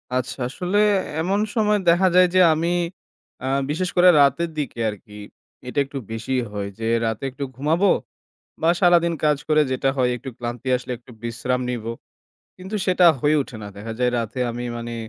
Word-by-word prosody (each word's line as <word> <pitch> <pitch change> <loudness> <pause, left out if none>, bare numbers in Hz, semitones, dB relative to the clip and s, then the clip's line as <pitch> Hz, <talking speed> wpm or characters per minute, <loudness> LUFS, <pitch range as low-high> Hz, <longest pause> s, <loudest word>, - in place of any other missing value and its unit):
আচ্ছা 130 +1 -3
আসলে 180 +8 -2 0.4
এমন 195 +4 0 0.2
সময় 210 -2 +2
দেখা 180 +3 +4
যায় 180 0 +7
যে 185 - +6
আমি 170 +3 0 0.7
আ - - -2 0.2
বিশেষ 180 +4 -1
করে 180 0 +7
রাতের 140 +5 +2
দিকে 140 -5 -4
আর 105 - -5
কি 105 0 -13 0.5
এটা 145 - -1
একটু 140 +1 -8
বেশি 115 +4 -4 0.2
হয় 100 -1 -4
যে 115 - -2 0.2
রাতে 110 +3 -3
একটু 140 +2 -6
ঘুমাবো 165 +8 +2 0.7
বা 165 - +4
সারাদিন 170 -2 +4
কাজ 150 -1 +3
করে 155 0 +4
যেটা 130 +1 0
হয় 125 -1 +2
একটু 130 +2 -8
ক্লান্তি 120 +2 -5
আসলে 125 0 -6
একটু 125 - -18
বিশ্রাম 125 +2 -2
নিবো। 115 -1 -4 0.6
কিন্তু 190 +3 -8
সেটা 180 -1 +4
হয়ে 150 +1 +3
ওঠে 120 - -11
না। - - -6
দেখা 110 +2 -6
যায় 125 0 +2
রাতে 115 +2 -4
আমি 120 +1 -5
মানে 120 0 -5
140 Hz, 180 wpm, -22 LUFS, 120-175 Hz, 0.7 s, যায়